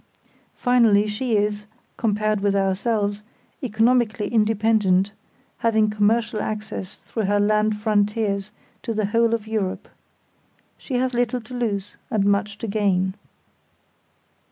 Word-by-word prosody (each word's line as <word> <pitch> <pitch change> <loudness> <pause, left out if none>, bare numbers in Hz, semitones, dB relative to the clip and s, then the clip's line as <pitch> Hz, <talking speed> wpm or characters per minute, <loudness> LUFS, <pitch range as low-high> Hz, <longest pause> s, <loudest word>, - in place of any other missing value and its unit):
Finally, 230 -5 +4
she 215 +2 -1
is, 210 0 -1 0.3
compared 215 -1 0
with 200 0 +1
ourselves, 200 +1 0 0.4
economically 230 -2 +1
independent, 210 -3 +2 0.5
having 220 -2 +2
commercial 215 +1 +1
access 210 -3 -5
through 220 -3 -4
her 205 +1 +2
land 210 +1 +2
frontiers 210 -1 0 0.3
to 230 -3 -4
the 215 -1 +1
whole 230 +3 +2
of 220 -2 -6
Europe. 215 -4 -3 0.9
She 265 - -5
has 255 +1 0
little 245 0 0
to 230 +3 -12
lose 205 -5 -3
and 205 -2 +1
much 205 +1 +1
to 225 - -5
gain. 195 -3 +1
215 Hz, 120 wpm, -23 LUFS, 205-225 Hz, 0.9 s, Finally